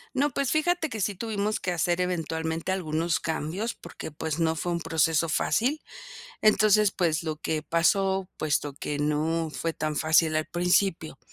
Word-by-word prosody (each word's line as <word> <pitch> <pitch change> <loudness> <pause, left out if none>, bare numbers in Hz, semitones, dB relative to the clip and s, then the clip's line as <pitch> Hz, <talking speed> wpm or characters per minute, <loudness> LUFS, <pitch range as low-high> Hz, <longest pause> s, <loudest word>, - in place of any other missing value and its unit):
No, 285 +3 +2
pues, 275 0 -1
fíjate 320 +1 +1
que 225 - -5
sí 200 0 -1
tuvimos 215 0 -2
que 180 - -1
hacer 175 +1 +1
eventualmente 165 -1 -2
algunos 165 -2 -1
cambios, 165 +8 -3
porque - - -9
pues 155 +1 -4
no 160 -1 +1
fue 175 +2 -2
un 170 - -2
proceso 160 0 +1
fácil. 255 - +1 0.6
Entonces, 215 -1 +5
pues, 165 -4 0
lo 155 -2 -3
que 155 0 -2
pasó, 190 +3 +1
puesto 150 -2 -1
que 145 +1 -4
no 155 +2 0
fue 165 +2 -3
tan 155 -1 -3
fácil 155 0 +3
al 155 - +1
principio, 175 -1 0
165 Hz, 165 wpm, -27 LUFS, 160-200 Hz, 0.6 s, Entonces